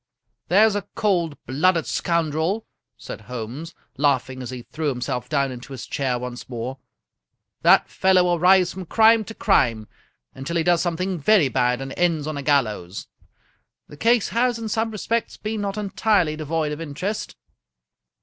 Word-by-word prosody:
"There's 210 +4 +5
a 205 -1 -3
cold 175 -8 0
blooded 165 +6 +2
scoundrel!" 170 +5 -1 0.3
said - - -8
Holmes, 125 +8 -7 0.2
laughing 130 -2 0
as 125 - -6
he 125 -2 -7
threw 155 +3 -3
himself 125 -2 -3
down 140 -3 +1
into 125 +2 -9
his 130 - -7
chair 130 -3 -1
once 125 0 -7
more. 125 +2 -5 0.4
" - - -58
That - - +5
fellow 190 -1 +3
will 175 -1 +1
rise 185 +1 +4
from 185 -2 -8
crime 225 +2 +5
to 225 - -9
crime 115 - +2 0.5
until 135 +6 -5
he 165 - +1
does 175 0 +3
something 180 +1 -2
very 175 -2 +4
bad 125 +1 +1
and 135 0 -6
ends 165 -4 +1
on 155 0 -4
a 140 - -4
gallows. 110 -10 -1 0.8
The - - -11
case 230 +5 +2
has, 240 0 +1
in 225 -1 -5
some 225 +1 0
respects, 225 +2 -2
been 215 0 -4
not 200 0 -3
entirely 200 -5 +1
devoid 155 0 -2
of 150 +2 -5
interest." 165 +8 -4
160 Hz, 165 wpm, -23 LUFS, 130-195 Hz, 0.8 s, There's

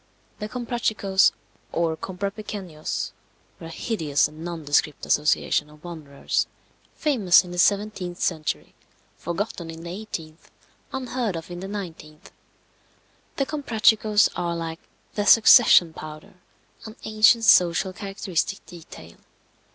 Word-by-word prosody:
The 210 0 -5
Comprachicos, 220 -5 +1 0.4
or 165 -1 0
Comprapequeños, 195 -2 -5 0.5
were 165 - -8
a - - -9
hideous 160 -6 0
and 155 +2 -12
nondescript 155 -3 -1
association 150 0 +1
of 150 0 -18
wanderers, 155 -5 -3 0.5
famous 215 - +4
in 180 - -10
the 175 - -4
17th 200 -2 +1
century, 160 -5 -2 0.5
forgotten 170 0 -4
in 165 0 -9
the 170 - -6
18th, 175 -5 -8 0.4
unheard 250 -6 -3
of 165 +1 -7
in 175 - -6
the 190 - -6
19th. 165 -6 -8 1.0
The 275 - 0
Comprachicos 220 -7 +3
are 170 -1 -2
like 165 0 -5 0.3
the 205 -1 -2
"succession 220 -7 +7
powder," 155 -1 -10 0.5
an 220 0 -9
ancient 220 +2 +4
social 180 -2 +4
characteristic 195 -1 -3
detail. 160 - -13
180 Hz, 115 wpm, -24 LUFS, 160-215 Hz, 1.0 s, succession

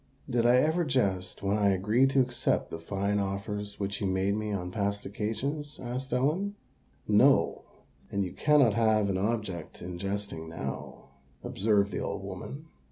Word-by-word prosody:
"Did 120 -3 +2
I 120 - +6
ever 155 +7 +3
jest 100 - 0
when 100 +2 +1
I 100 -1 +4
agreed 105 +8 +3
to 135 0 +4
accept 125 -1 0
the 80 - -5
fine 100 +4 -1
offers 100 +1 -3
which 100 +1 -3
you 100 - +1
made 95 +1 +1
me 105 0 -2
on 90 -3 -3
past 100 0 -1
occasions?" 140 +9 -3
asked 125 +2 -4
Ellen. 155 +11 +1 0.5
"No: - - +4 0.5
and 100 0 0
you 90 - -6
cannot 145 -7 +4
have 110 -2 +3
an 95 - 0
object 100 -6 -2
in 90 0 -6
jesting 100 -4 -4
now," 80 - -6 0.3
observed 100 0 +1
the - - -2
old - - -3
woman. 145 +4 -7
105 Hz, 165 wpm, -29 LUFS, 100-125 Hz, 0.5 s, I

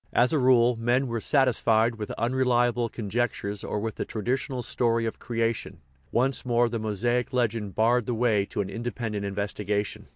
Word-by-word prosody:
As 125 +5 +3
a 155 - +3
rule, 125 -2 +4
men 120 +4 +1
were 115 -3 -3
satisfied 120 -4 +3
with 105 -1 -5
unreliable 120 -1 +1
conjectures 105 -2 -3
or 105 - -2
with 110 0 -4
the - - -1
tradi 115 +3 -2
tional 130 -2 -3
story 115 -1 +1
of 115 - -4
creation; 115 -1 -2 0.3
once 130 +3 +1
more 120 -1 +2
the 115 0 -3
Mosaic 115 +4 0
legend 115 -6 -1
barred 115 +1 +2
the 120 - -1
way 110 -4 +2
to - - -2
an 95 - -4
independent 115 -3 -4
investigation. 100 +1 -3
115 Hz, 170 wpm, -26 LUFS, 110-125 Hz, 0.3 s, rule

